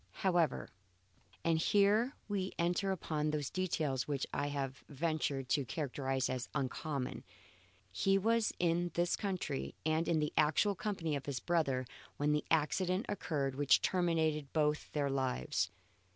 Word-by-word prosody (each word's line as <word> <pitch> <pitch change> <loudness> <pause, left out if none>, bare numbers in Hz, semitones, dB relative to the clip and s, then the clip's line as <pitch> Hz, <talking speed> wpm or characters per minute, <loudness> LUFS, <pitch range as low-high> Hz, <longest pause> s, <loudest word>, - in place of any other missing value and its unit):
However, 175 -4 +2 0.8
and 165 -1 +3
here 205 - +3
we 195 -2 -2
enter 175 +3 +1
upon 155 -4 -1
those 150 -3 -2
details 155 -8 -1
which 140 -2 -1
I 145 - 0
have 140 -2 -3
ventured 145 -3 -1
to 145 - +2
characterize 130 +1 -1
as 130 -2 -3
uncommon, 140 0 -2 0.7
he 195 - +3
was 225 +2 +2
in 175 0 +1
this 175 0 +2
country 180 - -3
and 160 +1 +1
in 165 - +3
the 150 -1 0
actual 160 +7 +3
company 180 -6 -2
of 140 - -5
his 140 -3 -2
brother 135 -4 +1 0.3
when 145 +1 +2
the 150 0 +1
accident 180 +5 +1
occurred 150 -9 -1
which 140 +1 +4
terminated 160 -5 +1
both 150 -1 +1
their 145 -2 0
lives. 90 - 0
155 Hz, 140 wpm, -35 LUFS, 140-175 Hz, 0.8 s, which